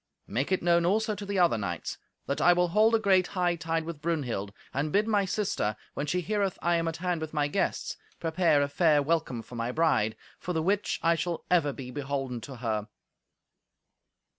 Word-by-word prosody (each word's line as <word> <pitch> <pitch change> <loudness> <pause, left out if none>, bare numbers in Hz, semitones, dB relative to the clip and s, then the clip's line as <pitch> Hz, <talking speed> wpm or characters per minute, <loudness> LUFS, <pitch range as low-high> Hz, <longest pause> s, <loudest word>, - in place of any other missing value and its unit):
Make 135 +9 -2
it 185 - +1
known 170 0 +4
also 215 +5 +2
to 200 0 -7
the 200 -1 -2
other 170 -11 +4
knights 90 -4 -4 0.3
that 140 - -2
I 175 - +6
will 180 0 +2
hold 215 +5 +4
a - - +3
great 190 -4 +3
hightide 165 -2 0
with 165 -3 -6
Brunhild; 135 -12 -2 0.2
and 145 +3 -1
bid 210 +5 +2
my 205 -3 +2
sister, 185 - -1 0.2
when 145 - -3
she 180 +5 0
heareth 200 0 -1
I 175 0 +2
am 165 0 -1
at 165 - -2
hand 180 -2 -1
with 160 0 -5
my 145 -1 +2
guests, 145 - -1 0.2
prepare 165 -3 +2
a - - 0
fair 150 0 +3
welcome 140 -7 -1
for - - -14
my 115 0 -2
bride; 125 -8 +2 0.2
for 180 - -3
the 160 -1 0
which 200 +4 0
I 165 - +5
shall 170 +1 -3
ever 165 -5 +4
be 130 -2 -8
beholden 135 -3 -3
to 135 +3 -8
her." 110 -3 -2
165 Hz, 200 wpm, -28 LUFS, 140-180 Hz, 0.3 s, I